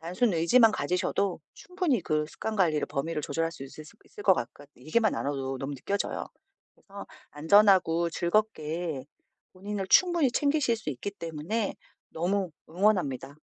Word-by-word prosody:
단순 180 +7 0
의지만 215 +8 +5
가지셔도 180 +2 -1
충분히 360 - -1
그 155 -2 0
습관 215 +7 -5
관리를 160 -6 +2
범위를 155 +3 -3
조절할 165 +3 -2
수 145 - -10
있으시 150 +3 -11
있을 205 - -11
것 195 - +6
같것 145 +3 -6
얘기만 180 - +1
나눠도 135 -2 -3
너무 135 +2 -4
느껴져요. 200 +10 -3 0.5
그래서 200 -1 -11 0.2
안전하고 170 0 +4
즐겁게 170 - -1 0.5
본인을 195 +1 -5
충분히 345 -7 +5
챙기실 285 -4 +1
수 215 - -8
있기 140 +9 -5
때문에 175 +4 -3 0.3
너무 185 +3 -1 0.2
응원합니다. 175 - 0
175 Hz, 345 characters per minute, -28 LUFS, 155-210 Hz, 0.5 s, 것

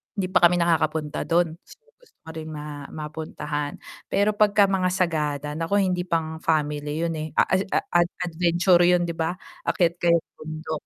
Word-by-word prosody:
hindi 195 -2 -1
pa - - +5
kami 175 - 0
nakakapunta 160 -3 0
dun, 170 -1 +1
gustong-gusto 475 - -22
ko 160 - -11
rin 160 -1 -7
ma 150 -2 -7
mapuntahan, 150 -1 -5 0.3
pero 200 +1 +2
pagka-mga 200 -3 +3
Sagada 150 -5 -1
naku 165 +5 -1
hindi 180 -1 -1
pang 160 -2 -1
family 150 -1 -1
yun 165 -1 -1
eh, 155 - -3
a - - +5
ed 190 +1 +2
ad - - +1
ad 175 0 +4 0.2
adventure 175 +1 +3
yun 180 0 +4
'di 170 - -2
ba? 165 +2 -1 0.3
Akyat 170 -4 +2
kayong 170 -1 +3 0.2
bundok 155 0 -5
165 Hz, 165 wpm, -24 LUFS, 155-180 Hz, 0.3 s, pa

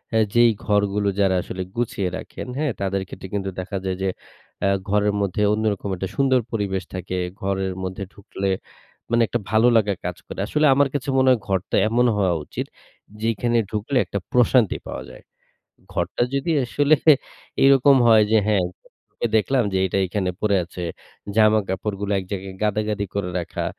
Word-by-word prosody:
আ - - +5 0.2
যেই 120 0 +6
ঘরগুলো 105 -1 +1
যারা 95 -2 +3
আসলে 95 - -6
গুছিয়ে 105 -6 -1
রাখেন, - - -8
হ্যাঁ? 150 -3 0
তাদের 95 0 0
ক্ষেত্রে 95 +1 -9
কিন্তু 95 -1 -2
দেখা 95 +2 -4
যায় 95 -1 -1
যে, 95 - +1 0.5
অ্যা 100 - +2 0.2
ঘরের 105 0 +2
মধ্যে 100 +1 -1
অন্যরকম 105 -2 -1
একটা 95 +2 -4
সুন্দর 130 -2 +3
পরিবেশ 100 -4 -2
থাকে। 90 0 -4 0.2
ঘরের 95 -1 -1
মধ্যে 95 +2 -4
ঢুকলে 100 -1 -4 0.6
মানে 120 0 +3
একটা 120 - -1
ভালো 110 +3 +4
লাগা 105 -2 +2
কাজ 90 -1 -3
করে। - - -8
আসলে 150 +6 +2
আমার 140 +1 +4
কাছে 140 -1 -2
মনে 130 0 +4
হয় 125 - +3
ঘরটা 95 -2 -1
এমন 120 +3 +2
হওয়া 95 -4 +2
উচিত, - - -5 0.6
যেইখানে 115 +1 +1
ঢুকলে 110 +6 -1
একটা 100 - -3
প্রশান্তি 125 -3 +3
পাওয়া - - -5
যায়। - - -14 0.7
ঘরটা 85 +6 -1
যদি 140 +5 -1
আসলে 145 +4 +3 0.7
এরকম 135 0 +6
হয় 110 -2 +7
যে, 110 - +5
হ্যাঁ, 100 -4 +3 0.7
দেখলাম 125 +4 +2
যে, - - 0
এইটা 95 +1 0
এখানে 95 -1 -1
পড়ে 100 -2 +2
আছে। 90 +1 -8 0.5
জামাকাপড়গুলো 105 -1 +1
এক 95 - -4
জায়গায় 95 -1 -5
গাদাগাদি 105 -1 0
করে 95 -3 -2
রাখা। 85 - -4
105 Hz, 165 wpm, -22 LUFS, 95-115 Hz, 0.7 s, হয়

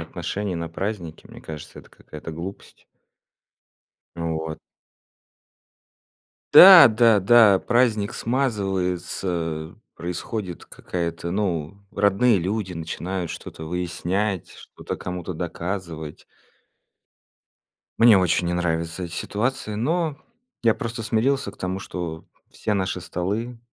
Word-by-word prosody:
отношений 100 -2 -4
на 85 -1 -4
празднике, 90 -2 -5
мне - - -13
кажется, 75 -2 -9
это - - -21
какая-то 75 +2 -10
глупость. 85 +5 -9 1.3
Ну 85 -1 -2
вот. 80 -1 -6 1.9
Да, 185 -5 +11
да, 115 -1 +4
да, 105 -1 +6
праздник 115 -4 +1
смазывается, 90 - -2 0.2
происходит 90 +2 -5
какая-то 85 -1 -4
ну 95 -2 -2 0.2
родные 100 +2 +3
люди 95 +1 -2
начинают 85 +2 -4
что-то 80 - -8
выяснять, 90 +3 -2
что-то - - -8
кому-то 90 0 -5
доказывать. 85 -2 -5 1.7
Мне 115 -3 +7
очень 90 -1 +1
не 85 - 0
нравится 85 0 -2
эти 85 - -8
ситуации, 110 +3 -2
но 155 +6 0 0.5
я 115 -2 +4
просто 115 0 -5
смирился 115 +2 0
к - - -19
тому, 95 +1 -3
что 85 -4 -6 0.3
все 105 - -2
наши 95 -1 -1
столы 105 +7 -3
95 Hz, 105 wpm, -23 LUFS, 85-110 Hz, 1.9 s, Да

